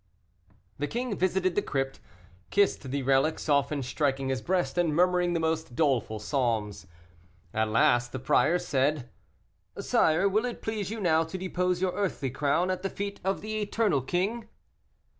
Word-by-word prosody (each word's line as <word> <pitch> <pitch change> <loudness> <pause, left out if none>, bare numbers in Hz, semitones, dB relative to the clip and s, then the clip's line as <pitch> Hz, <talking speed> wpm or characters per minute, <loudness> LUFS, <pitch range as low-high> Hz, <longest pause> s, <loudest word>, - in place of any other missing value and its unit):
The 145 - -1
king 240 +1 -3
visited 185 0 +1
the - - +1
crypt, 135 -1 -3 0.5
kissed 200 -9 +1
the 140 +1 -2
relics 135 +5 +1
often 140 -1 +1
striking 135 +1 -1
his 130 -1 -1
breast, 180 +2 0
and 165 -4 +1
murmuring 180 0 +3
the 170 - 0
most 160 -5 -2
doleful 130 -7 +1
psalms. 110 -4 -2 0.7
At 110 0 0
last 120 +2 +3
the - - -4
prior 155 +6 +3
said, 140 -4 -1 0.7
"Sire, 160 +5 +3
will 215 +4 +1
it 245 - -5
please 215 -3 -3
you 225 +1 -4
now 165 -4 +3
to 160 +4 -6
depose 180 -1 -1
your 185 -1 +1
earthly 185 -9 -2
crown 150 +7 +1
at 185 -1 -3
the 195 - -2
feet 200 +1 -5
of 195 +1 -1
the 215 0 -3
eternal 205 -7 +1
king?" 195 - -2
160 Hz, 160 wpm, -28 LUFS, 135-190 Hz, 0.7 s, murmuring